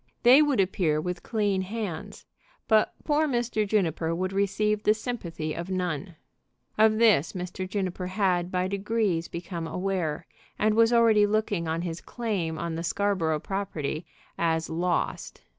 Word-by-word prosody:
They 250 Hz, +4 st, +8 dB
would 290 Hz, -6 st, +2 dB
appear 180 Hz, -5 st, +1 dB
with 180 Hz, +2 st, -4 dB
clean 205 Hz, -4 st, 0 dB
hands; 195 Hz, -4 st, -5 dB, 0.4 s
but 220 Hz, -1 st, +3 dB
poor 305 Hz, +1 st, +2 dB
Mr. 240 Hz, -5 st, 0 dB
Juniper 165 Hz, -5 st, 0 dB
would 185 Hz, +2 st, -2 dB
receive 210 Hz, +2 st, +1 dB
the 215 Hz, 0 st, +3 dB
sympathy 170 Hz, -10 st, -4 dB
of 170 Hz, +2 st, -5 dB
none. 180 Hz, -2 st, -3 dB, 0.6 s
Of 215 Hz, 0 st, +4 dB
this 215 Hz, -10 st, +4 dB
Mr. 185 Hz, 0 st, -5 dB
Juniper 185 Hz, -2 st, -2 dB
had 185 Hz, -2 st, 0 dB
by 180 Hz, 0 st, 0 dB
degrees 200 Hz, -3 st, 0 dB
become 170 Hz, -1 st, -5 dB
aware, 180 Hz, -4 st, -2 dB, 0.3 s
and 215 Hz, 0 st, +2 dB
was 225 Hz, +1 st, +4 dB
already 225 Hz, -3 st, +5 dB
looking 205 Hz, -5 st, 0 dB
on 165 Hz, +1 st, -1 dB
his 170 Hz, -1 st, -4 dB
claim 195 Hz, -9 st, -3 dB
on 170 Hz, 0 st, -3 dB
the 165 Hz, +1 st, -4 dB
Scarborough 170 Hz, -4 st, 0 dB
property 175 Hz, -5 st, -3 dB, 0.3 s
as 165 Hz, -1 st, 0 dB
lost. 175 Hz, +2 st, -2 dB
190 Hz, 145 wpm, -27 LUFS, 170-215 Hz, 0.6 s, They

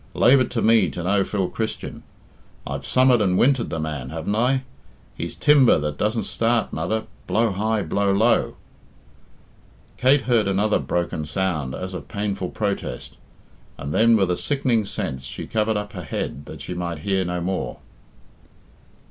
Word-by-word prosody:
Lave 130 Hz, +3 st, +6 dB
it 130 Hz, -, 0 dB
to 115 Hz, -, -1 dB
me 110 Hz, -5 st, +4 dB
to 85 Hz, +5 st, -6 dB
know 100 Hz, +2 st, +2 dB
Phil 95 Hz, -2 st, -1 dB
Christian. 110 Hz, +3 st, -4 dB, 0.6 s
I've 70 Hz, 0 st, -5 dB
summered 130 Hz, -2 st, +4 dB
and 90 Hz, -3 st, +2 dB
wintered 130 Hz, 0 st, +3 dB
the 80 Hz, -, -3 dB
man, 75 Hz, -5 st, -4 dB
haven't 80 Hz, +5 st, -3 dB
I? 130 Hz, +4 st, +2 dB, 0.5 s
He's -, -, -5 dB
timber 145 Hz, -4 st, +5 dB
that 75 Hz, -1 st, -3 dB
doesn't 110 Hz, +2 st, 0 dB
start, 115 Hz, 0 st, 0 dB
mother, 110 Hz, +8 st, -1 dB, 0.2 s
blow 115 Hz, -1 st, +2 dB
high, 105 Hz, +2 st, 0 dB
blow 100 Hz, +4 st, +1 dB
low." 110 Hz, +5 st, +2 dB, 1.4 s
Kate 135 Hz, +2 st, +4 dB
heard 115 Hz, -5 st, +2 dB
another 100 Hz, +2 st, +2 dB
broken 80 Hz, +2 st, -2 dB
sound 80 Hz, -6 st, -2 dB
as 95 Hz, 0 st, -5 dB
of 80 Hz, -7 st, -7 dB
painful 100 Hz, -1 st, -3 dB
protest, 100 Hz, -, -4 dB, 0.6 s
and 70 Hz, +1 st, -5 dB
then 115 Hz, +3 st, +5 dB
with 95 Hz, -3 st, +2 dB
a 90 Hz, -, 0 dB
sickening 130 Hz, -6 st, 0 dB
sense 65 Hz, -7 st, -4 dB
she -, -, -6 dB
covered 110 Hz, 0 st, 0 dB
up 105 Hz, 0 st, -5 dB
her 90 Hz, -, -6 dB
head 70 Hz, -2 st, -4 dB
that -, -, -9 dB
she -, -, -5 dB
might 85 Hz, -2 st, -3 dB
hear 95 Hz, -1 st, +1 dB
no 90 Hz, 0 st, -2 dB
more. 90 Hz, +2 st, -3 dB
100 Hz, 165 wpm, -23 LUFS, 85-115 Hz, 1.4 s, Lave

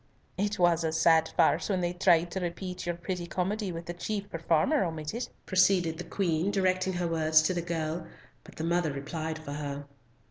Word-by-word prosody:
"It 205 Hz, +1 st, -1 dB
was 175 Hz, -2 st, +3 dB
a 160 Hz, -, 0 dB
sad 160 Hz, 0 st, +4 dB
farce -, -, +3 dB
when 190 Hz, -2 st, +1 dB
they 175 Hz, 0 st, -1 dB
tried 175 Hz, -2 st, +3 dB
to 190 Hz, -, -2 dB
repeat 180 Hz, +1 st, -5 dB
your 175 Hz, -, 0 dB
pretty 175 Hz, 0 st, -4 dB
comedy 195 Hz, +3 st, -2 dB
with 165 Hz, 0 st, -6 dB
the 175 Hz, -, -4 dB
chief 200 Hz, +3 st, -4 dB
performer 165 Hz, -, +2 dB
omitted," 165 Hz, +7 st, -4 dB, 0.2 s
proceeded 185 Hz, -3 st, +3 dB
the -, -, -3 dB
Queen, 170 Hz, -1 st, 0 dB
directing 185 Hz, -1 st, +1 dB
her 175 Hz, -1 st, -1 dB
words 155 Hz, -1 st, +4 dB
to 185 Hz, -, +1 dB
the 175 Hz, -, -1 dB
girl, 165 Hz, -1 st, -3 dB, 0.4 s
but -, -, -15 dB
the 160 Hz, -, -5 dB
mother 170 Hz, -1 st, +1 dB
replied 155 Hz, +3 st, -4 dB
for 155 Hz, -2 st, -8 dB
her. 145 Hz, -1 st, -5 dB
175 Hz, 190 wpm, -29 LUFS, 160-185 Hz, 0.4 s, sad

